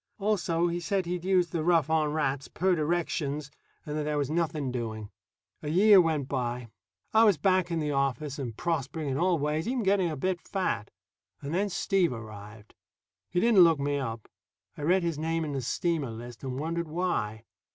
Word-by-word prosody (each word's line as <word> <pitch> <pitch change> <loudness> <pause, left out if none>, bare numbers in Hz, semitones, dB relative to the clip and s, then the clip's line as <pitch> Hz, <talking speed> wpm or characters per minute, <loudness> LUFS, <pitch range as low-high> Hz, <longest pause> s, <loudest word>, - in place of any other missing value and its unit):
Also, 185 -5 +1
he 175 0 -1
said 190 +1 -1
he'd 175 0 -3
used 180 -3 +2
the 165 -2 -1
"rough 165 -3 +3
on 155 -2 +1
rats," 140 -3 -1
per 185 +2 +1
directions, 150 -3 -1 0.3
and 150 - -4
that 155 - -1
there 150 0 -1
was 145 0 -1
nothing 155 -5 -1
doing. 110 -4 -5 0.5
A - - -6
year 195 +4 +7
went 155 -5 0
by. 125 -3 -3 0.4
I 220 +1 +6
was 205 -7 +5
back 185 +2 +2
in 170 - -1
the 150 -2 -1
office 140 +1 -1
and 120 -5 -5
prospering 155 -2 -2
in 135 +2 -1
all 180 0 +3
ways 150 +4 -1
even 250 -1 0
getting 190 -3 +2
a 155 - -4
bit 185 +4 -1
fat. 185 - -2 0.5
And 140 +2 -5
then 200 +3 +1
Steve 195 -3 +1
arrived. 105 -1 -10 0.6
He 175 - 0
didn't 225 -2 +5
look 165 -2 +5
me 145 0 0
up. 115 -4 -5 0.5
I - - -9
read 180 +5 +3
his 165 -3 -1
name 165 +1 -1
in 150 - -4
the 135 -2 -2
steamer 155 +2 -1
list, 120 +2 -9
and 130 -1 -4
wondered 165 +3 -2
why. 155 -11 -2
155 Hz, 195 wpm, -28 LUFS, 135-175 Hz, 0.6 s, year